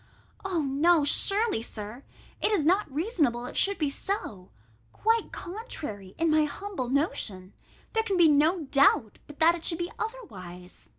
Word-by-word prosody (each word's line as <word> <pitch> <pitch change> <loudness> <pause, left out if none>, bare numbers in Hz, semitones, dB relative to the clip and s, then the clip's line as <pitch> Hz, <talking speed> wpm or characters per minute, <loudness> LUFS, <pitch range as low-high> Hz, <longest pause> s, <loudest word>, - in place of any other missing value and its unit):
No, 325 -2 +2
surely, 400 - +3
Sir, 215 +2 -8 0.4
it - - +2
is 390 -8 +2
not 370 -1 +2
reasonable 290 - -1
it - - -8
should 400 0 +3
be 300 -5 0
so: 225 - -5 0.4
quite 450 +1 0
contrary, 295 - -7
in 330 0 +1
my 310 0 +4
humble 335 -4 -5
notion, 210 - -2 0.4
there 450 - +2
can 400 -4 -1
be 340 -2 +6
no 310 +4 +3
doubt, 275 -6 +2
but 295 - -12
that 330 +2 +5
it 340 -1 -7
should 330 - +3
be 345 +1 -4
otherwise. 185 - -8
310 Hz, 155 wpm, -27 LUFS, 245-385 Hz, 0.4 s, be